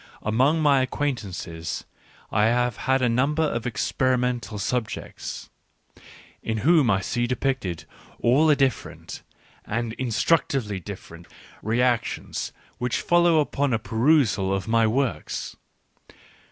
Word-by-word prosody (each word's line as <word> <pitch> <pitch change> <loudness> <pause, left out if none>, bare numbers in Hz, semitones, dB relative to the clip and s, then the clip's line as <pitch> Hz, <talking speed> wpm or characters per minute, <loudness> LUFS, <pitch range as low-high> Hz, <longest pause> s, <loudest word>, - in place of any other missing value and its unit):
Among 130 +9 +2
my 140 -3 +5
acquaintances 100 - -3 0.5
I 105 0 +3
have 120 0 +2
a 130 -1 +3
number 135 +7 +1
of 120 -6 -1
experimental 125 -1 0
subjects, 110 +3 -4 0.9
in 110 -1 -2
whom 155 -6 +5
I 95 -2 +2
see 120 +5 -1
depicted 125 - -2 0.3
all 135 +7 +4
the 150 - +5
different, 135 -2 -2 0.4
and 115 0 -3
instructively 125 - 0
different, 85 -3 -10 0.3
reactions 120 +1 -1 0.3
which 125 +1 -1
follow 175 -2 +4
upon 145 -2 0
a - - +3
perusal 115 -4 +2
of 95 +2 -2
my 115 0 +3
works. 115 - -2
120 Hz, 110 wpm, -24 LUFS, 110-135 Hz, 0.9 s, my